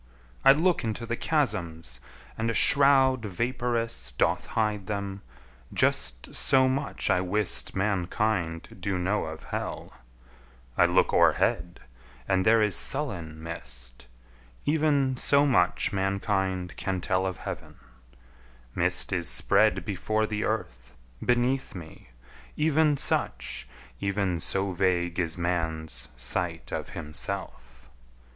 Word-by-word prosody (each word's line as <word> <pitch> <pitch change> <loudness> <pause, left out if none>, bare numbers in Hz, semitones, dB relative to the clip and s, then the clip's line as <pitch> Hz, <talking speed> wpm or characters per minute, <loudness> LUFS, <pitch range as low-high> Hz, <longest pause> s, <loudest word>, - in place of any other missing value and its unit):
I - - +9
look 170 +5 +2
into 115 +1 -3
the 120 +1 -2
chasms, 85 - -1 0.4
and 115 +1 -1
a 115 - -1
shroud 135 -1 +5
Vapurous 115 - -2
doth 60 - 0
hide 105 -3 0
them 100 -1 -4 0.5
just - - 0
so 130 -1 +3
much 135 +2 0
I 90 - +3
wist 100 +2 0
Mankind 95 -3 -1
do 95 +1 -2
know 95 +3 0
of 80 0 -8
hell; - - -5 0.8
I - - +5
look - - +2
o'erhead, 85 0 +2 0.5
And 95 0 +2
there 110 0 +5
is 105 -4 +2
sullen 80 -1 -1
mist, - - -7 0.6
even 145 -4 +2
so 140 +3 +3
much 90 -10 +2
Mankind 95 -1 -1
can 95 -1 -2
tell 95 +1 0
of 95 0 -4
heaven; - - -7 1.0
mist - - +2
is - - 0
spread - - +3
Before 110 0 -1
the 105 -1 -3
earth, 60 - -4 0.3
beneath 125 +1 +1
me, 80 -8 -11 0.5
even 155 -1 +3
such, 60 - -1 0.3
Even 100 -3 -1
so 95 +4 0
vague 90 -1 0
is 85 -2 -1
man's 80 -2 -2
sight 80 +7 -2
of - - -4
himself! 65 -4 -5
95 Hz, 120 wpm, -27 LUFS, 85-115 Hz, 1.0 s, I